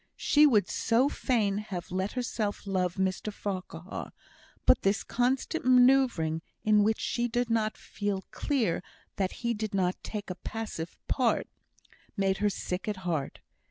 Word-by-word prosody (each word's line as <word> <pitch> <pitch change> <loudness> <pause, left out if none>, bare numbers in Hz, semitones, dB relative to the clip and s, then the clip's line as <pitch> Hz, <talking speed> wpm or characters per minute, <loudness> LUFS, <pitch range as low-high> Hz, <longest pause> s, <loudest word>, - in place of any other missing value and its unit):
She 300 0 +5
would 210 -9 +4
so 240 +5 +2
fain 210 -9 +1
have 190 -5 -6
let 190 +2 -1
herself 225 -5 -2
love 185 -2 0
Mr 190 +2 -1
Farquhar; 185 -3 -5 0.5
but - - +5
this 195 +1 +1
constant 260 +6 0
manoeuvring, 245 -11 +4 0.2
in 210 -1 +5
which 220 +1 +2
she 240 0 0
did 240 0 -1
not 220 -1 +1
feel 205 -2 -3
clear 230 - 0 0.4
that 190 -2 0
he 235 - +2
did 215 -2 -3
not 185 -1 0
take 210 -3 -5
a - - -4
passive 215 -7 -5
part, 250 -3 +2 0.7
made 195 -1 +2
her 210 0 +2
sick 185 0 -4
at 210 -1 -1
heart. 160 -6 -2
210 Hz, 150 wpm, -29 LUFS, 190-235 Hz, 0.7 s, She